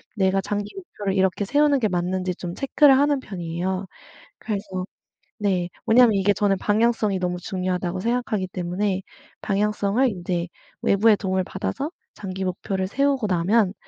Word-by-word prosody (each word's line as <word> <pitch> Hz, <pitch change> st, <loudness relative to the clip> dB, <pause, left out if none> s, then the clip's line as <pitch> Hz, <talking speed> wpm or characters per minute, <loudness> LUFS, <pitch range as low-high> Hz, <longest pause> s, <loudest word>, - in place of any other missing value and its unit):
내가 195 Hz, -1 st, +2 dB
장기 205 Hz, -, -3 dB
목표를 210 Hz, -, -4 dB
이렇게 190 Hz, +1 st, +1 dB
세우는 290 Hz, +5 st, +3 dB
게 220 Hz, -, +2 dB
맞는지 180 Hz, 0 st, -1 dB
좀 175 Hz, -2 st, -6 dB
체크를 275 Hz, 0 st, +5 dB
하는 285 Hz, 0 st, +3 dB
편이에요. 185 Hz, -2 st, -3 dB, 0.5 s
그래서 195 Hz, -3 st, -4 dB, 0.6 s
네 185 Hz, -4 st, 0 dB, 0.2 s
왜냐하면 235 Hz, 0 st, +6 dB
이게 200 Hz, 0 st, +3 dB
저는 200 Hz, -1 st, +1 dB
방향성이 215 Hz, -1 st, +2 dB
너무 180 Hz, -1 st, -2 dB
중요하다고 185 Hz, -1 st, -2 dB
생각하기 230 Hz, -4 st, -1 dB
때문에 185 Hz, +2 st, -2 dB, 0.4 s
방향성을 210 Hz, +4 st, +1 dB
인제 175 Hz, -4 st, -2 dB, 0.4 s
외부의 210 Hz, +2 st, +4 dB
도움을 190 Hz, -1 st, 0 dB
받아서 265 Hz, -, -3 dB, 0.2 s
장기 190 Hz, -2 st, -5 dB
목표를 190 Hz, +1 st, -2 dB
세우고 275 Hz, +1 st, +1 dB
나면 190 Hz, +3 st, +2 dB
195 Hz, 355 characters per minute, -23 LUFS, 185-220 Hz, 0.6 s, 왜냐하면